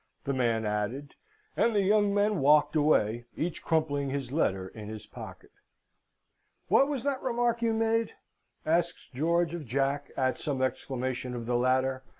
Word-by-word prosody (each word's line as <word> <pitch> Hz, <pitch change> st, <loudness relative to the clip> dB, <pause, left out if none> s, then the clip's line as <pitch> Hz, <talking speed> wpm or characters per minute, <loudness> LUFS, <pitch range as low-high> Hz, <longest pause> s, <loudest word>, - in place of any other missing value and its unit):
the 140 Hz, -, -1 dB
man 115 Hz, -4 st, +1 dB
added. 105 Hz, +7 st, -3 dB, 0.4 s
And 230 Hz, -2 st, +2 dB
the 200 Hz, -, +3 dB
young 205 Hz, +1 st, +3 dB
men 205 Hz, -1 st, +2 dB
walked 150 Hz, +3 st, +4 dB
away, 120 Hz, -7 st, +2 dB
each 165 Hz, 0 st, -3 dB
crumpling 145 Hz, -4 st, 0 dB
his 135 Hz, -2 st, -4 dB
letter 95 Hz, -11 st, 0 dB
in 105 Hz, +2 st, -9 dB
his 110 Hz, -1 st, -8 dB
pocket. -, -, -11 dB, 1.2 s
"What 275 Hz, -, +5 dB
was 280 Hz, -5 st, -2 dB
that 280 Hz, -2 st, -1 dB
remark 240 Hz, -1 st, 0 dB
you 230 Hz, -1 st, +2 dB
made?" 225 Hz, 0 st, +1 dB, 0.5 s
asks 170 Hz, +2 st, 0 dB
George 170 Hz, +4 st, +1 dB
of 170 Hz, -3 st, -4 dB
Jack, 140 Hz, +3 st, -1 dB
at 130 Hz, -1 st, 0 dB
some 140 Hz, -3 st, -2 dB
exclamation 130 Hz, -1 st, -3 dB
of 120 Hz, -1 st, -5 dB
the 120 Hz, +1 st, 0 dB
latter. 130 Hz, +1 st, +1 dB
145 Hz, 155 wpm, -29 LUFS, 125-190 Hz, 1.2 s, What